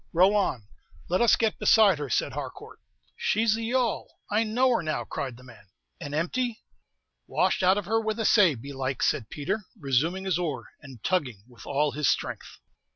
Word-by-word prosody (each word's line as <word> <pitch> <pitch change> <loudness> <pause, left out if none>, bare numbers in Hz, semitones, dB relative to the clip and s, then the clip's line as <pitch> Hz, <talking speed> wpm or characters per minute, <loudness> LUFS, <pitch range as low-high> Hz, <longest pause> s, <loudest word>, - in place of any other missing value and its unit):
"Row 185 +4 +5
on, 165 - 0 0.4
let 180 +5 +1
us 235 - +6
get 220 -2 0
beside 205 -8 +5
her," 145 -2 -4
said - - 0
Harcourt. - - -8 0.4
"She's 220 +1 +1
the 225 +1 -3
yawl! 245 -1 -1 0.2
I 210 +2 +3
know 245 +4 +2
her 235 - +2
now," 155 -2 -2
cried 130 -4 -5
the 125 - -15
man. 115 -6 -16 0.3
"And 145 -4 -5
empty?" 235 +9 -2 0.6
"Washed - - +1
out 185 +1 +4
of 205 - -3
her 225 +4 +1
with 220 0 -2
a 225 - 0
say, 190 -10 +5
belike," 135 +1 -4
said 110 -6 0
Peter, 190 +8 -3
resuming 160 +7 0
his 185 -3 0
oar, 170 -4 -3
and 135 -7 -13
tugging 130 - -1
with 120 -2 -15
all 145 +1 +1
his 150 0 -1
strength. - - -3
175 Hz, 185 wpm, -27 LUFS, 140-215 Hz, 0.6 s, us